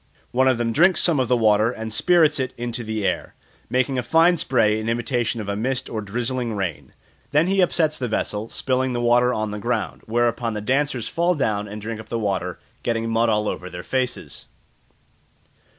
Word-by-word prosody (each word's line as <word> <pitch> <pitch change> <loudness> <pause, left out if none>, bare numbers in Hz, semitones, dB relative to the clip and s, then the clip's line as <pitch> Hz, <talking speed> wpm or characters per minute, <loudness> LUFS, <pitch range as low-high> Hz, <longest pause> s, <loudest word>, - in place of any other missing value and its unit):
One 130 +2 +3
of 130 -2 +3
them 115 -1 -1
drinks 175 +6 +4
some 165 -5 +4
of 130 - +1
the 125 - +3
water 110 -1 +4
and 110 -2 -5
spirts 160 0 +3
it 130 - -2
into 120 0 -4
the 110 -2 -3
air, - - -2 0.3
making 130 +2 +1
a - - +1
fine 165 +7 +4
spray 115 -8 +2
in 110 +1 -3
imitation 120 0 -1
of 105 - -5
a 100 - -2
mist 130 +4 -2
or 110 - -3
drizzling 120 +2 -2
rain. 95 -6 -4 0.4
Then 150 +3 +3
he 195 +1 +2
upsets 160 -3 +1
the 125 - -1
vessel, 110 0 -2
spilling 130 -1 -1
the 120 - -1
water 120 +1 +3
on 110 -3 -2
the 105 - -5
ground; 120 0 -2
whereupon 115 0 0
the - - -2
dancers 130 +2 0
fall 175 +1 +1
down 105 -7 -1
and 105 +1 -7
drink 110 +1 -5
up 110 - -11
the 115 - -2
water, 95 -4 -2 0.2
getting 115 -1 -1
mud 115 +1 +2
all 105 -1 +1
over 90 - -4
their 90 -1 -8
faces. 125 - -3
120 Hz, 200 wpm, -22 LUFS, 110-130 Hz, 0.4 s, drinks